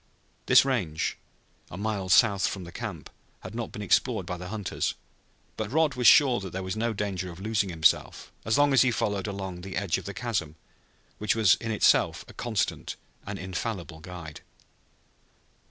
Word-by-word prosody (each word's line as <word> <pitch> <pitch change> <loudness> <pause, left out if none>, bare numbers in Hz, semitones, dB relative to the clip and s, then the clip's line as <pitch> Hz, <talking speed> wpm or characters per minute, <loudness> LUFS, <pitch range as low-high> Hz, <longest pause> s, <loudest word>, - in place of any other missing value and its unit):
This - - +7
range, 95 - -1 0.5
a 85 - -8
mile 100 -2 -2
south 100 -1 +4
of 95 - -8
the 85 - -10
camp, - - -6 0.3
had - - -9
not 115 0 -4
been 105 - -6
explored 110 -1 +2
by 90 0 -4
the 90 +1 -7
hunters, 105 0 -2 0.6
but 110 -1 -3
Rod 155 0 +2
was 125 -1 +2
sure 135 -6 +7
that 95 -1 -6
there 95 +2 -4
was 95 +1 -3
no 115 +2 0
danger 100 -4 -3
of 85 - -11
losing 105 -1 0
himself 80 -3 +1
as 110 - +1
long 145 -1 +4
as 135 - +6
he 130 - +4
followed 105 -3 -1
along 95 -3 -5
the 95 0 -6
edge 95 -3 0
of - - -12
the 100 - -6
chasm 105 -11 -2 0.6
which 105 +1 +1
was 110 -4 +5
in 115 - -4
itself 110 - +3
a - - -13
constant 110 -5 -2 0.3
and - - -4
infallible 90 -3 -5
guide. 85 -3 -9
100 Hz, 180 wpm, -27 LUFS, 90-115 Hz, 0.6 s, This